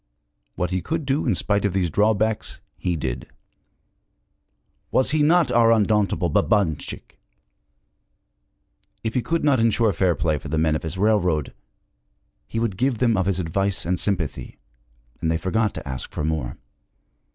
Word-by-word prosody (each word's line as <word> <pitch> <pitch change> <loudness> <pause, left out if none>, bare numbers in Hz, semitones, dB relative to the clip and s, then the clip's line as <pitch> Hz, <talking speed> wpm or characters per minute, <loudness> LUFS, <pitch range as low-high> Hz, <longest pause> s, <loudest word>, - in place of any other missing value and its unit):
What 90 0 -2
he 90 0 0
could 160 - -3
do 140 +1 0
in 110 - +2
spite 100 +2 0
of 100 -3 0
these 90 -4 0
drawbacks, 110 +3 +1 0.2
he 90 -2 -2
did. 65 -5 -4 1.6
Was 130 - +2
he 155 0 +2
not 165 +3 +4
our 115 -1 +5
undauntable 105 -4 +2
Babanchik? 85 -1 -1 1.8
If 110 -1 -2
he 125 - +1
could 165 +6 -1
not 140 -4 +3
insure 115 -1 +2
fair 90 -1 +2
play 75 -3 0
for - - -9
the 80 +1 -2
men 80 0 +2
of - - -2
his 80 +3 -5
railroad, 90 -8 +1 0.9
he - - -6
could 115 -5 -1
give 130 +1 +1
them 115 -1 +2
of 95 -1 0
his 95 -2 +1
advice 95 +3 -1
and 90 +1 0
sympathy, 90 -7 -2 0.6
and 80 - 0
they 80 - +1
forgot 105 +4 0
to - - -7
ask 65 -1 -5
for - - -4
more. 75 -6 -2
100 Hz, 160 wpm, -23 LUFS, 80-115 Hz, 1.8 s, our